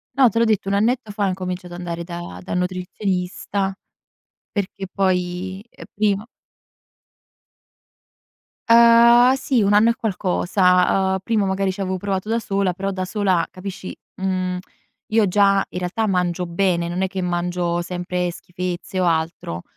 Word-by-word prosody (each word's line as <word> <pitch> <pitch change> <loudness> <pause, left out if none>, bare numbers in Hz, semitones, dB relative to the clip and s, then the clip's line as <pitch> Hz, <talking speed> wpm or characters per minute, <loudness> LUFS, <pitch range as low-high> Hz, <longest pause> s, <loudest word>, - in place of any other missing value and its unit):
No, 260 -3 +6
te 230 - -4
l'ho 230 - +4
detto, 215 -3 +1
un 200 - +1
annetto 225 +2 +1
fa, 205 0 -1
ho - - +2
incominciato 180 -1 -5
ad 175 - -7
andare 170 -1 -4
da 170 - -7
dal - - -4
nutrizionista. 185 +1 -2 0.8
Perché 195 -1 -3
poi, 185 +1 -1
uhm, - - -12
prima 210 +1 0 2.4
Uhm, 235 +2 +7
sì, 265 -2 +1
1 205 0 +3
anno 215 +3 +5
e 235 - +1
qualcosa. 185 -2 +2
Uhm, 190 - +1
prima, 220 -4 +1
magari, 190 0 0
c'avevo 190 -1 -2
provato 195 +2 -3
da 230 - +1
sola, 195 -4 0
però 195 +2 -3
da 185 -1 -3
sola, 185 -4 +1
capisci 185 0 -7 0.3
mhmm, 185 -1 -1 0.5
io 220 -1 +3
già, 195 +1 +3
in 180 - -5
realtà, 200 +5 -1
mangio 180 -1 0
bene, 170 0 0
non 175 +2 -3
è 190 - +1
che 190 0 -4
mangio 175 -1 -1
sempre 180 0 -2
schifezze 180 +1 -5
o - - +2
altro. 160 - -1
190 Hz, 150 wpm, -21 LUFS, 180-205 Hz, 2.4 s, Uhm